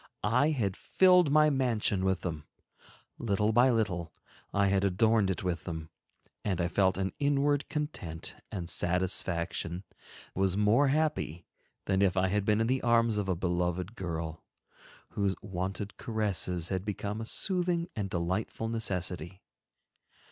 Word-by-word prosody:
I 135 +5 +4
had 110 -11 0
filled 180 -4 +4
my 155 0 +5
mansion 115 -8 +1
with 95 -1 +1
them; 80 -4 -4 0.7
little 105 -1 +1
by 120 +4 +5
little, 95 -9 0 0.4
I 100 0 +2
had 100 0 +2
adorned 100 +2 +3
it 95 - -2
with 90 -2 -2
them, 80 -2 -6 0.5
and 95 -4 -1
I 85 -1 +1
felt 95 -1 +2
an 95 0 -1
inward 145 0 +1
content 120 - -4 0.2
and 85 -2 -4
satisfaction, 85 0 0 0.5
was 95 0 +1
more 105 +7 +4
happy 140 - 0 0.4
than 95 -1 +1
if 95 -1 +2
I 95 0 +3
had 105 +1 0
been 105 0 +3
in - - +2
the 130 +2 +1
arms 115 -2 +3
of 100 -2 -2
a 95 - +2
beloved 90 +3 -1
girl, 80 -4 -4 0.7
whose 100 -2 0
wonted 95 +1 -4
caresses 95 -6 -1
had 95 -1 -2
become 105 +1 -4
a - - -4
soothing 175 - 0
and 100 -3 -2
delightful 95 +5 -2
necessity. 90 -5 -2
100 Hz, 145 wpm, -30 LUFS, 90-115 Hz, 0.7 s, my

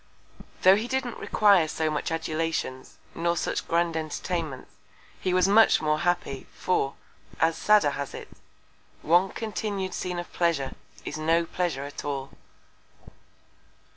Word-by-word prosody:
Tho' 185 +1 +8
he 225 +3 -3
didn't 260 -2 -2
require 200 -6 +4
so 155 0 -1
much 150 - -2
Adulations, 160 -5 -3 0.2
nor 170 +1 0
such - - -2
grand 170 0 +1
Entertainments, 160 -2 -4 0.5
he 185 - -1
was 185 +1 +3
much 220 +3 +6
more 155 0 +1
happy; 175 -6 -1
for, 140 -6 0 0.4
as 160 0 +3
Sadder 210 -9 +4
has 140 0 -5
it, - - -9 0.7
One 175 +4 +4
continued 205 -4 -3
Scene 180 -1 -3
of 175 - -6
Pleasure, 165 -6 +1 0.3
is 150 - -5
no 165 +2 +2
Pleasure 165 -5 -2
at 145 0 -7
all. 140 -2 -4
170 Hz, 135 wpm, -26 LUFS, 155-185 Hz, 0.7 s, Tho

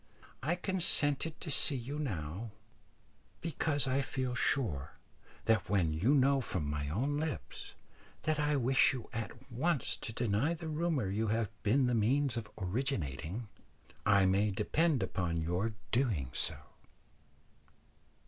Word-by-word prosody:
I 155 +7 +1
consented 165 -5 +2
to 155 - -3
see 140 - +5
you 135 +4 -4
now, 95 - -3 0.9
because 155 -2 +1
I 130 +1 +2
feel 130 -2 -2
sure 100 - 0 0.5
that 110 -6 +2
when 90 -6 +2
you 105 - +3
know 135 0 +4
from 90 - -2
my 75 -1 -2
own 135 - 0
lips 155 -3 -5 0.5
that 155 -1 +1
I 150 0 +2
wish 135 0 +4
you 125 -3 -7
at 120 +3 -6
once 140 +3 0
to - - -5
deny 120 +7 +1
the 160 -1 -6
rumour 155 - 0
you 110 +3 0
have 110 0 0
been 130 +6 +3
the 125 - +1
means 125 +4 +2
of 110 -3 -4
originating, 95 - -2 0.6
I 100 -1 +5
may 100 +3 +3
depend 130 - +1
upon 90 -3 -1
your 90 +7 -1 0.2
doing 105 - +1
so." - - 0
120 Hz, 140 wpm, -33 LUFS, 100-145 Hz, 0.9 s, see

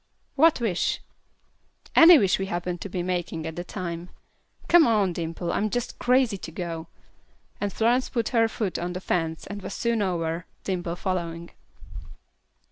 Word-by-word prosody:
"What 315 +2 +4
wish?" 215 -7 0 1.0
"Any 330 0 +10
wish 195 -8 +2
we 195 - -2
happen 175 -1 -3
to 200 - -6
be 180 -1 -3
making 175 -3 -3
at 160 0 -5
the 175 - -4
time. 175 -2 -6 0.6
Come 345 -2 +6
on, 205 -5 +2
Dimple, 165 +1 -3
I - - 0
am 215 - 0
just 245 +2 -3
crazy 250 -5 +2
to 165 - -8
go." 165 -1 -5 0.7
And 205 -1 -1
Florence 240 +5 +1
put 235 -3 -1
her 230 -2 +3
foot 210 -5 -3
on 175 +1 -3
the 180 - -4
fence 165 -3 -2
and 205 +1 -7
was - - -6
soon 235 -2 0
over, 170 -3 -2 0.2
Dimple 175 -3 -2
following. 170 -2 -3
185 Hz, 165 wpm, -26 LUFS, 170-225 Hz, 1.0 s, Any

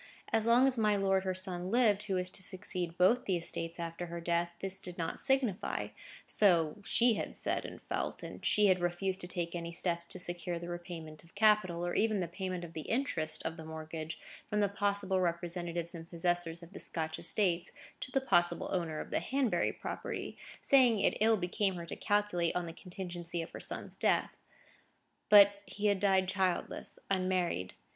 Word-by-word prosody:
As 225 0 +2
long 240 +3 +6
as 260 -3 +2
my 210 -1 +3
lord, 195 -1 +2
her 185 -1 -1
son, 185 -1 -2
lived, 220 -3 +3
who 200 -3 -2
was 180 0 -1
to 190 - -2
succeed 185 -1 -3
to 165 - -17
both 230 +8 +4
the 185 -3 +1
estates 165 0 -2
after 170 +1 -4
her 170 0 -5
death, 170 0 0
this 195 0 -4
did 180 -1 -6
not 165 -1 -3
signify; 265 -7 0 0.4
so 170 -4 +3
she 235 +3 +3
had - - -4
said - - +2
and - - -8
felt; - - -3
and - - -8
she 210 - +4
had 185 -2 +4
refused 185 +2 -1
to 175 - -5
take 175 -2 -3
any 170 -1 -4
steps 170 0 -1
to - - -5
secure 175 -1 -2
the 170 +1 -7
repayment 170 -3 -7
of 170 - -21
capital, 200 -5 +3
or 175 - -2
even 215 -1 +2
the 175 - -1
payment 185 0 -4
of 170 -1 -8
the 155 - -6
interest 225 - 0
of 160 0 -3
the 160 - -8
mortgage 160 0 -6 0.3
from 210 - 0
the 205 - +4
possible 200 -1 0
representatives 170 0 -2
and 165 -1 -9
possessors 170 -1 -1
of 170 +3 -13
the - - -8
Scotch 160 -1 0
estates, 180 -4 +1 0.3
to - - -4
the 270 +1 +1
possible 175 -9 +2
owner 165 -4 -1
of - - -7
the - - +1
Hanbury 265 -4 +1
property; - - -5 0.3
saying 250 -6 +5
it - - +2
ill 220 0 +5
became 190 +1 0
her 170 -1 -6
to - - -6
calculate 205 -5 +1
on 180 -1 0
the 165 - -7
contingency 175 -1 -6
of 165 - -10
her - - -8
son's - - -3
death. - - +2 1.0
But 205 -1 +9 0.2
he 200 +3 -5
had 200 -2 +3
died 190 -1 +3
childless, 190 -1 -1
unmarried. 185 - 0
180 Hz, 195 wpm, -33 LUFS, 170-200 Hz, 1.0 s, But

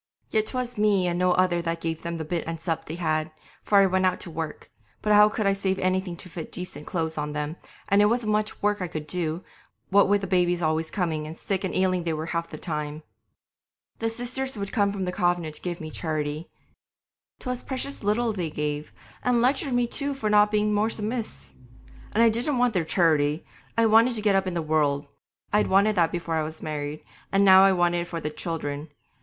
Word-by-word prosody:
Yet 215 0 +1
'twas 250 -2 -3
me 205 -3 +3
and 175 0 0
no 180 0 +3
other 180 -2 +2
that 165 0 -2
gave 165 -1 -3
them 170 0 -4
the 160 - -4
bit 170 +1 -3
and 165 0 -4
sup 160 0 -2
they 160 - -5
had, 155 -2 0 0.3
for 205 - +2
I 195 - +7
went 190 0 +2
out 185 - 0
to 175 - -6
work; 160 -1 -6 0.3
but 210 - +3
how 210 0 +7
could 215 0 -2
I 195 - +4
save 195 -1 -1
anything 185 -1 -1
to 180 - -9
fit 165 -2 -7
decent 165 -5 -5
clothes 160 -3 -2
on 150 0 -3
them, 150 +1 -3 0.3
and 200 +1 +4
it - - +6
wasn't 230 -1 0
much 210 0 -1
work 205 -1 +1
I 180 - -1
could 155 -3 -5
do, 165 0 -2 0.5
what 200 0 +5
with 205 0 +3
the - - -2
babies 175 -2 +2
always 160 -1 0
coming, 160 -5 -2
and 160 +2 -8
sick 195 -1 -2
and 190 - -2
ailing 185 -1 +1
they 165 -1 -1
were 155 +1 -3
half 170 0 -1
the - - -7
time. 150 -1 -4 1.0
The 225 - 0
Sisters 245 +2 -2
would 200 -1 -4
come 205 -4 +2
from 195 -2 -3
the 180 - -2
convent 175 -4 0
to - - -7
give 175 -1 -4
me 155 -1 -7
charity. 155 0 -3 0.9
'Twas 250 -1 -4
precious 275 +1 -3
little 220 +3 +1
they 175 -5 -2
gave, 150 0 -3 0.3
and 250 -1 +2
lectured 265 +2 +1
me 245 0 +3
too 280 +4 -1
for 215 -6 -1
not 210 0 +6
being 210 0 +1
more 210 +2 +2
submiss'! 225 +1 -4 0.6
And 225 - +4
I 230 - +7
didn't 245 +5 0
want 245 -1 +2
their 175 -4 0
charity; 155 -3 +2 0.3
I 230 - +5
wanted 225 +3 +5
to 215 - -3
get 205 -2 +4
up 195 0 +2
in 180 - -3
the 170 - -1
world. 150 -2 +1 0.5
I'd 210 - +3
wanted 200 +3 +4
that 170 -2 +3
before 170 -1 -3
I - - +1
was 155 +1 -4
married, 150 -1 -4 0.3
and 195 +1 +4
now 190 0 +8
I 195 - +6
wanted 175 -1 +2
it 170 - -3
for 170 - -4
the 150 -1 -4
children. 150 -2 -4
180 Hz, 225 wpm, -26 LUFS, 160-210 Hz, 1.0 s, now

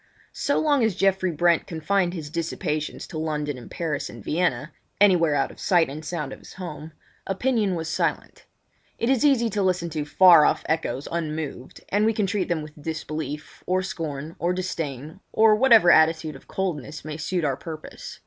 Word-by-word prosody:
So 285 - 0
long 290 -5 +2
as 220 -5 +1
Geoffrey 190 -1 +2
Brent 170 +1 +2
confined 180 +2 0
his 150 -4 -6
dissipations 160 -2 -3
to 155 - -6
London 150 -2 -2
and 125 - -11
Paris 160 -4 -3
and 115 -3 -11
Vienna—anywhere 165 +2 +1
out 140 - 0
of - - -16
sight 175 -5 +3
and 155 +3 -7
sound 155 -5 -4
of - - -11
his - - -13
home—opinion 190 +6 -3
was 165 -1 -4
silent. - - -2 0.5
It 235 +3 +1
is 265 -1 +2
easy 270 -5 +4
to 205 - -1
listen 180 -3 0
to 150 -1 -2
far 170 +2 +7
off - - +2
echoes 145 -4 -1
unmoved, 155 -5 -4
and 205 +2 +2
we 225 +1 +3
can 210 -2 0
treat 195 -1 -1
them 165 -3 -1
with 150 0 -12
disbelief, 155 -2 -5
or 185 +1 +1
scorn, 160 -4 -5
or 175 +1 +1
disdain, 160 -3 -4
or 220 -1 +5
whatever 225 -6 +6
attitude 160 -1 +3
of 135 - -14
coldness 155 -6 -4
may 155 0 -5
suit 175 +2 -2
our 140 -2 +1
purpose. 155 +2 -9
165 Hz, 175 wpm, -24 LUFS, 150-190 Hz, 0.5 s, far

